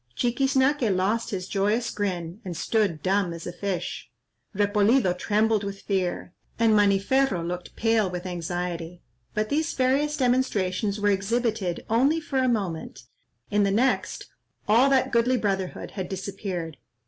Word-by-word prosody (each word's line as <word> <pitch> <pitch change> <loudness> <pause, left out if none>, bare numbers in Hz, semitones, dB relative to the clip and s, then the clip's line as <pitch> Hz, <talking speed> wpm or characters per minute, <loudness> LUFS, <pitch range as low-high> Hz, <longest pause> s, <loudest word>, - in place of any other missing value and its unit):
Chiquiznaque 265 +1 +2
lost 205 +6 0
his 185 -4 -4
joyous 210 +4 0
grin, 180 -1 -3
and 175 -3 -5
stood 195 -7 0
dumb 190 -2 +1
as 165 -1 -8
a 175 - -5
fish; 190 0 -4 0.5
Repolido 205 +1 +3
trembled 215 +3 +1
with 195 0 -5
fear, 185 -2 -2 0.2
and 230 -1 +4
Maniferro 200 +1 +2
looked 180 0 -6
pale 225 -3 +2
with 180 0 -5
anxiety. 175 -1 -4 0.3
But 215 0 0
these 315 +3 0
various 275 +4 +1
demonstrations 210 -6 0
were 205 0 +3
exhibited 205 -2 -1
only 270 +8 +3
for 275 -4 -2
a 255 -1 +2
moment,—in 165 - -4
the 200 - +3
next, 245 +6 0 0.4
all 235 +6 +5
that 270 -2 +2
goodly 235 +2 +3
brotherhood 195 -4 -2
had 190 -3 -5
disappeared. 190 -5 -5
205 Hz, 135 wpm, -25 LUFS, 180-235 Hz, 0.5 s, all